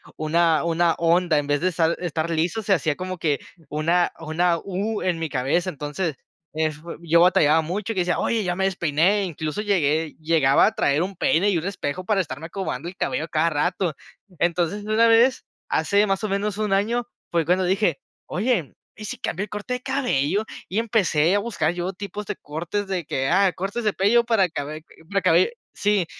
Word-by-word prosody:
una 160 +1 +2
una 170 0 +2
onda. 170 -1 +2
En 145 - -1
vez 145 0 +1
de 180 - 0
estar 165 -1 +1
estar 165 -2 -2
liso, 170 +7 0
se 210 - -3
hacía 155 -4 +1
como 185 +2 -5
que 150 -5 0 0.3
una 165 +4 +1
una 165 +2 +1
U 205 +3 -2
en 180 -2 0
mi 165 - -2
cabeza. 145 +7 0
Entonces, 150 +1 -3 0.4
eh, 160 +1 0
f 155 -1 -7 0.2
yo 170 0 +3
batallaba 160 -3 +5
mucho, 190 +7 -3
y - - -14
que 185 - +1
decía: 175 0 0
"Oye 225 -3 0
ya 180 -1 -1
me 190 - +1
despeiné". 180 +2 +2
incluso, 160 +1 -4
llegué 160 -6 +1
llegaba 155 -4 +4
a - - +1
traer 145 +2 +2
un 190 +2 -3
peine 185 +3 +2
y 185 - +2
un 165 - -3
espejo, 185 -3 -3
para 205 0 +1
estarme 155 -1 -6
acomodando 170 -5 -4
el 180 - -12
cabello - - -1
a - - -13
cada 160 +2 +2
rato. 175 +2 0 0.4
Entonces, 175 +4 0
una 220 +2 +3
vez, 235 +3 +4 0.2
hace 205 +1 +2
más 195 +1 -1
o - - -2
menos, 200 +1 -1
1 210 -2 0
año, 230 +5 0 0.2
fue 170 -2 +1
cuando 180 +3 +2
dije: 185 -4 +1 0.3
"Oye, 195 - -1 0.2
¿y 215 - -8
si - - -5
cambió 190 +4 -3
el - - -7
corte 210 +5 -4
de 250 - -6
cabello?". 220 - 0 0.2
Y, 195 - -1
empecé 190 -8 +2
a - - +3
buscar 200 -7 -1
yo, 180 +2 -3
tipos 205 +2 -6
de - - -4
cortes, 170 +7 -4
de 185 -4 -2
que, 135 -2 -1
ah, 190 +2 +4
cortes 200 +7 -4
de 210 - +2
pello 235 +5 +3
para 220 -6 +2
cabe 155 +1 -5 0.4
cabe 170 - +4 0.2
Sí. 205 -3 +1
180 Hz, 200 wpm, -23 LUFS, 160-200 Hz, 0.4 s, batallaba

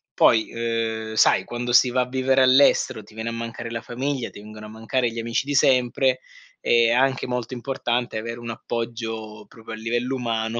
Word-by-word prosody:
poi, 110 -2 +4
uhm, 115 -1 -2
sai, - - +4
quando 120 0 -4
si 125 +1 +6
va 125 +1 0
a - - -8
vivere 130 +1 +2
all'estero 130 -4 +4
ti 105 - -18
viene 110 +1 -6
a 115 - -1
mancare 115 0 -6
la 115 0 -4
famiglia, 130 0 -3
ti - - -13
vengono 105 +1 -11
a - - -11
mancare 115 +2 -1
gli 115 - -6
amici 115 +3 -1
di 145 - -3
sempre, 130 -1 +3 0.4
è 115 -1 +4
anche 130 +2 +2
molto 125 0 -3
importante 120 -2 -2
avere 115 +2 -5
un 120 0 -7
appoggio 115 -2 -5
proprio 115 0 -11
a - - -4
livello 120 +4 -2
umano 115 -2 -2
115 Hz, 195 wpm, -23 LUFS, 115-125 Hz, 0.4 s, si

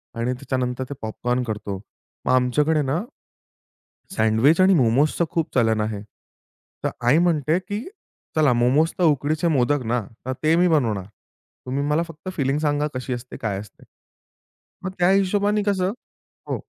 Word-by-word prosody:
आणि 120 +2 -1
त्याच्यानंतर 130 -1 -2
ते - - -3
पॉपकॉर्न 125 +3 -2
करतो. 105 -4 -4 0.5
मग - - +2
आमच्याकडे 150 +5 +2
ना 145 +6 0 1.2
सँडविच 110 +10 +4
आणि 190 +1 +6
मोमोसच 145 +5 +2
खूप 165 -2 -1
चालन 110 -3 +3
आहे. 105 -1 -3 0.8
तर - - +1 0.2
आई 135 +6 +6
म्हणते 165 -1 +2
की 205 +3 -5 0.5
"चला 150 -5 +4
मोमोस 130 +7 +3
तर 180 - +2
उकडीचे 155 +2 +2
मोदक 145 -2 +2
ना, 120 +1 0 0.2
तर 130 - -1
ते 155 +1 +4
मी 180 +1 +4
बनवणार. 115 - +1 0.6
तुम्ही 135 +2 -2
मला 150 +3 +2
फक्त 165 +3 -9
फिलिंग 135 0 +1
सांगा 150 -1 +1
कशी 130 0 -3
असते. 120 +1 -7
काय 100 -3 -2
असते." 105 -1 -13 1.0
मग 185 - -3
त्या 175 +1 +4
हिशोबाने 205 +2 +2
कसं 195 -2 +1 0.6
हो. - - -1
145 Hz, 150 wpm, -23 LUFS, 125-165 Hz, 1.2 s, आणि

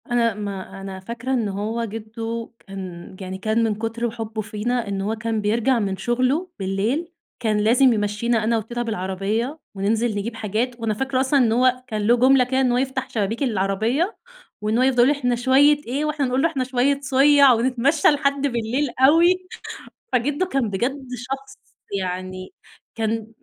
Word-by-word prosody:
أنا 235 -2 +1
ما 200 -2 -6
أنا 195 -1 -7
فاكرة 235 +6 -4
إن 230 -5 0
هو 215 +4 -2
جدو 225 +1 -5 0.2
كان 185 -2 -8
يعني 190 0 -5
كان 220 +4 0
من 220 -2 +1
كُتر 225 +2 -3
حُبُّه 225 -1 -5
فينا، 220 +2 -2
إن 195 -1 -2
هو 210 +3 -1
كان 225 0 -2
بيرجَع 235 +4 +2
من 195 -3 -2
شغلُه 255 - 0
بالليل، 215 - -1 0.3
كان 215 -3 0
لازم 240 +4 +4
يمشّينا 215 +2 0
أنا 230 +1 +2
وتيتا 235 +2 -4
بالعربية، 215 - -2 0.2
وننزل 215 +3 0
نجيب 225 +3 -3
حاجات، 225 +3 -2
وأنا 225 -1 -1
فاكرة 265 +3 -1
أصلًا 275 +2 +2
إن 235 -4 +3
هو 255 +2 +2
كان 215 -3 -3
له 240 - +6
جُملة 260 +1 +5
كده 260 +1 0
إن 255 -2 +2
هو 245 - +2
يفتح 265 0 -2
شبابيك 220 +4 -1
العربية 225 - 0 0.4
وإن 215 +2 0
هو 255 - +3
يفضَل 255 -2 +4
يقول: 265 - +4
"إحنا 245 -3 +1
شوية 270 +4 +4
إيه؟" 275 +5 -1
وإحنا 300 -2 0
نقول 255 +1 0
له: 330 - +4
"إحنا 270 -5 -2
شوية 260 +2 +1
صيَّع"، 275 0 +6
ونتمشّى 260 +5 +2
لحد 280 -2 +2
بالليل 245 +3 -1
أوي، 340 +7 +5 0.7
فجدو 290 +8 +1
كان 270 - -1
بجد 260 +8 -2
شخص 270 +3 -7 0.4
يعني 185 - -5 0.4
كان 225 -1 -2
235 Hz, 170 wpm, -22 LUFS, 215-265 Hz, 0.7 s, له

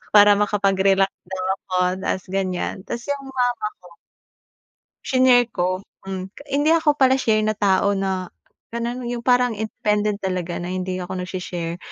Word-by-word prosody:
para 205 0 +9
makapag-relax 195 -1 +2 0.2
daw 190 0 -4
ako, 185 -1 -4 0.3
tapos 185 - -1
ganyan. 190 0 -2
Tapos 235 - -4
iyong 280 -1 -2
mama 250 -2 +1 0.4
ko 170 - -18 1.1
shinare 255 -2 +5
ko, 185 +1 -1 0.2
hmm. 190 0 -6 0.2
Hindi 290 +4 +3
ako 305 -3 +3
pala 260 -1 +5
share 220 -5 +2
na 215 - +1
tao, 200 -1 +2
na 190 -1 -1 0.5
gano'n 240 +1 -3
'yong 240 0 -3
parang 245 -1 +3
independent 210 -1 -1
talaga, 185 -3 -3
na 175 +1 -4
hindi 185 0 -2
ako 180 0 -4
nag-shi-share. 175 -2 -4
200 Hz, 145 wpm, -22 LUFS, 185-240 Hz, 1.1 s, para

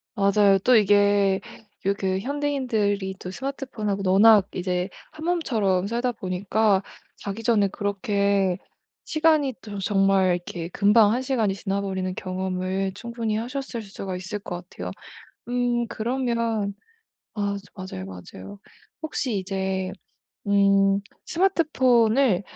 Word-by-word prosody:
맞아요. 200 -1 +4
또 245 +5 +4
이게 205 -1 +4 0.5
요 200 - +3
그 190 -1 0
현대인들이 240 -8 -1
또 180 - -7
스마트폰하고 215 -6 -3
워낙 210 0 +7
이제 180 0 -1 0.2
한몸처럼 245 - 0
살다 240 +2 0
보니까 195 +1 +1 0.4
자기 200 +3 -6
전에 220 -3 +3
그렇게 200 -1 0 0.5
시간이 310 -4 +2
또 205 -2 -7
정말 195 -2 +3
이렇게 175 -1 -6
금방 205 +3 +4
1 250 - 0
시간이 230 -7 0
지나버리는 195 -2 -2
경험을 185 +1 -2
충분히 235 -2 -3
하셨을 245 +1 -4
수가 195 -2 -6
있을 185 +3 -5
것 180 -4 -7
같아요. - - -6 0.6
음 245 -1 0
그러면 230 -3 -1 0.6
아 200 -1 -1 0.3
저 - - -8
맞아요, - - -6
맞아요. 95 - -10 0.4
혹시 260 -8 -2
이제 190 -1 -2 0.6
음 200 0 +4 0.3
스마트폰을 260 - +3
205 Hz, 260 characters per minute, -24 LUFS, 190-235 Hz, 0.6 s, 워낙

